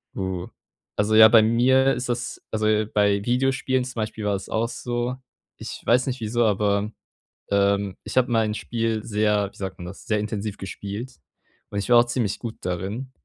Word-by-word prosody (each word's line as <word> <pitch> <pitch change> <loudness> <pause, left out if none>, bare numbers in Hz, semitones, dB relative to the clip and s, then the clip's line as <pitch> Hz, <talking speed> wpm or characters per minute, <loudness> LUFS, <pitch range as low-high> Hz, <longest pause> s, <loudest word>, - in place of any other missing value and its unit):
Uh. 95 -2 -3 0.5
Also, 105 +1 +1
ja, 110 0 +10
bei 110 0 +7
mir 130 +4 +4
ist 125 - -4
das 120 0 -3
also, 110 0 +1
bei 100 -1 +2
Videospielen 130 +1 +1
zum 130 0 -7
Beispiel 110 -1 -3
war 100 -1 +1
es 95 - -6
auch 115 +1 0
so. 120 +1 -3 0.4
Ich - - -7
weiß 125 +2 +3
nicht 130 -1 -2
wieso, 115 +1 0
aber, 105 0 +1 0.6
ähm, 100 -1 +2
ich - - -7
habe 125 -1 +3
mein 110 -2 +2
Spiel 115 -2 -2
sehr, 105 -2 +1
wie - - -20
sagt 95 -1 -5
man 90 - -8
das, 95 +2 -10
sehr 105 -1 +1
intensiv 105 -1 -4
gespielt. 100 +1 -7 0.5
Und 100 - -5
ich 100 - -4
war 120 - +7
auch 120 - +4
ziemlich 120 -4 -2
gut 115 -2 -6
darin, 95 +9 -4
110 Hz, 185 wpm, -24 LUFS, 100-120 Hz, 0.6 s, ja